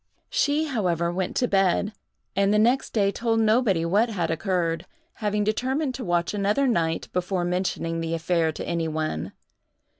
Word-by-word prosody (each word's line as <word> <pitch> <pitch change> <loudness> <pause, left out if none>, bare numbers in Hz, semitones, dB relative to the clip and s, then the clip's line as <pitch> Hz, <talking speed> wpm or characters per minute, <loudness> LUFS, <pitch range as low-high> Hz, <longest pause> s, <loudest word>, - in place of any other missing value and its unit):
She 305 -11 +2
however 180 - 0
went 185 0 -2
to 245 - +2
bed, 195 +1 +2 0.4
and 200 +1 +3
the 210 - +3
next 240 +5 +3
day 200 -3 +2
told 225 +1 0
nobody 215 -6 +3
what 205 +7 +2
had 180 -7 -1
occurred, 165 0 -1 0.3
having 210 0 +1
determined 260 +6 0
to 255 - -5
watch 175 -1 0
another 205 +6 +1
night 165 -10 0
before 180 0 -1
mentioning 175 -2 -1
the 165 0 -1
affair 165 -1 +1
to - - -6
any 170 -1 -1
one. 155 - -3
195 Hz, 160 wpm, -25 LUFS, 170-225 Hz, 0.4 s, and